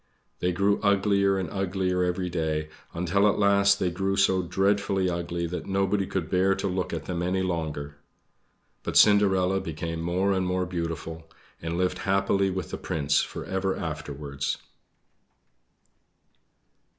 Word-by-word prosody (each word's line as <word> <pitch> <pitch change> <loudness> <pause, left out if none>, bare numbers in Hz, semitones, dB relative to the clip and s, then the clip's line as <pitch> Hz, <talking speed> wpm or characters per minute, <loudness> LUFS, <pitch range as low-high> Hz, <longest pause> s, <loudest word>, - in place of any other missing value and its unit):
They 90 - +1
grew 100 +3 +1
uglier 100 -1 +3
and 95 -2 -2
uglier 95 -2 0
every 90 +1 -1
day, 80 -3 -2 0.2
until 90 +4 +2
at - - 0
last 100 -1 +4
they 90 -2 0
grew 95 +2 -1
so 95 -1 +3
dreadfully 95 +1 +1
ugly 85 0 -3
that 85 +2 -5
nobody 95 0 +1
could 90 -5 -2
bear 95 +2 +2
to - - -4
look 95 0 -2
at 80 -2 -4
them 85 -2 -3
any 95 +1 0
longer. 75 -5 -3 0.8
But - - -1
Cinderella 95 -2 +5
became 80 +1 -4
more 90 +4 +1
and 95 -1 0
more 90 0 0
beautiful, 80 -2 -5 0.3
and 80 +1 -3
lived 90 0 0
happily 100 0 +1
with 95 -3 -4
the - - -4
Prince 70 -2 +1
for - - -6
ever 95 0 -1
afterwards. 75 -3 -4
90 Hz, 145 wpm, -26 LUFS, 85-95 Hz, 0.8 s, Cinderella